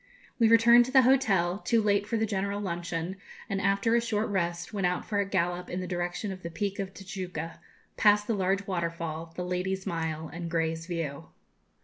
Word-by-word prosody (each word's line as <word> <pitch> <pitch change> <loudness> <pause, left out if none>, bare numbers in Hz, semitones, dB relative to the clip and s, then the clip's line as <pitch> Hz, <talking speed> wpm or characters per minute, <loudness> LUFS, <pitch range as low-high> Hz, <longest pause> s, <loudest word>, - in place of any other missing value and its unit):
We 230 - +6
returned 235 +1 +7
to 255 - -6
the 265 -1 +7
hotel, 200 -9 +3
too 230 +1 +2
late 205 -1 +2
for 230 - 0
the 220 - +1
general 200 -1 -2
luncheon, 175 -1 -3 0.3
and, 195 -1 -2
after 200 +4 +2
a 235 - +4
short 220 -2 -1
rest, 175 -2 -2
went 195 -3 +1
out 180 0 -2
for 205 -2 -1
a 200 -1 0
gallop 180 -1 -1
in 180 - -3
the 185 - -3
direction 175 +3 -3
of 185 -1 -7
the 170 - -5
peak 200 +3 -3
of 195 -1 -3
Tijuca, 185 -4 -6 0.4
past 210 -1 +5
the 230 - 0
large 195 0 0
waterfall, 170 -3 -3
the 180 - -3
'Ladies' 185 +1 -2
Mile,' 160 -1 -3
and 170 +2 -6
'Grey's 165 0 -1
View.' 165 -5 -4
190 Hz, 200 wpm, -29 LUFS, 170-205 Hz, 0.4 s, returned